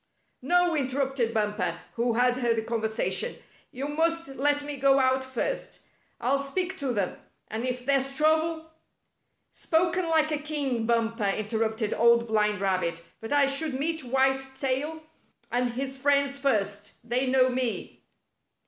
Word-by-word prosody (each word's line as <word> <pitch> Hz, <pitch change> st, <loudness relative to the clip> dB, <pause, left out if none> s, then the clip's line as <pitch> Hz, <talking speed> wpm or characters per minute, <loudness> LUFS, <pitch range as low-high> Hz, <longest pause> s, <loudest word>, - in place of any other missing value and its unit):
"No," 350 Hz, +5 st, +3 dB
interrupted 265 Hz, -3 st, 0 dB
Bumper, 210 Hz, -1 st, -1 dB
who 235 Hz, 0 st, 0 dB
had 245 Hz, +1 st, +2 dB
heard 240 Hz, -2 st, +1 dB
the 220 Hz, -, -1 dB
conversation. 225 Hz, -, -1 dB, 0.4 s
"You 270 Hz, +3 st, -4 dB
must 330 Hz, +1 st, 0 dB
let 290 Hz, +2 st, +1 dB
me 290 Hz, -1 st, -5 dB
go 275 Hz, 0 st, +4 dB
out 260 Hz, 0 st, +2 dB
first. 260 Hz, -, -4 dB, 0.3 s
I'll 265 Hz, +4 st, +1 dB
speak 365 Hz, +7 st, -2 dB
to 275 Hz, -3 st, -1 dB
them, 200 Hz, -6 st, -2 dB, 0.3 s
and 225 Hz, +4 st, -3 dB
if 250 Hz, 0 st, -3 dB
there's 275 Hz, -1 st, +2 dB
trouble 315 Hz, +2 st, +1 dB, 0.2 s
— -, -, -48 dB
" -, -, -47 dB
"Spoken 345 Hz, +1 st, +1 dB
like 315 Hz, -1 st, +3 dB
a 300 Hz, -, 0 dB
king. 280 Hz, -7 st, -2 dB
Bumper," 230 Hz, -2 st, +1 dB
interrupted 220 Hz, +1 st, -1 dB
Old 235 Hz, 0 st, +4 dB
Blind 210 Hz, -2 st, +1 dB
Rabbit, 185 Hz, -4 st, -1 dB, 0.2 s
"but 225 Hz, -, -8 dB
I 290 Hz, -1 st, +5 dB
should 275 Hz, +1 st, 0 dB
meet 315 Hz, +3 st, 0 dB
White 265 Hz, +1 st, +1 dB
Tail 275 Hz, +4 st, -2 dB, 0.5 s
and 245 Hz, 0 st, 0 dB
his 265 Hz, +1 st, -4 dB
friends 280 Hz, 0 st, +2 dB
first. 205 Hz, -6 st, 0 dB
They 250 Hz, +3 st, +1 dB
know 255 Hz, 0 st, +4 dB
me." 250 Hz, -2 st, -2 dB
265 Hz, 150 wpm, -27 LUFS, 230-290 Hz, 0.5 s, I